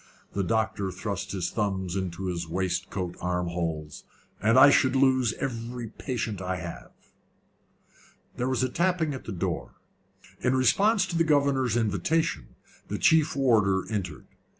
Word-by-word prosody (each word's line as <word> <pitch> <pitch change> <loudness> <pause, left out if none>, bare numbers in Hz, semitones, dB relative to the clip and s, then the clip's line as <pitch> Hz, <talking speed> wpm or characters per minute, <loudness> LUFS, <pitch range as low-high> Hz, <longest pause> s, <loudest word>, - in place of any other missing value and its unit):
The 100 - 0
doctor 110 -2 0
thrust 100 +2 -4
his 90 -3 -2
thumbs 95 -4 -2
into 95 -1 -3
his 85 -2 -3
waistcoat 90 0 -2
arm 90 -1 -1
holes. 80 -3 -4 0.4
"And 115 +5 +4
I 135 +2 +9
should 130 -1 +3
lose 130 -3 +3
every 120 -2 -5
patient 110 -5 -4
I 95 0 -2
have." 85 -2 -7 1.5
There 125 +1 -1
was 130 -1 0
a 130 - +1
tapping 170 0 0
at 130 - -8
the - - -5
door. 90 - -3 0.6
In 125 +1 +1
response 195 - +3
to 175 - -5
the 165 - +3
governor's 140 -6 +2
invitation, 110 - -1 0.3
the - - -3
chief 155 -1 +3
warder 105 -8 +3
entered. 95 -7 -4
110 Hz, 145 wpm, -27 LUFS, 90-130 Hz, 1.5 s, I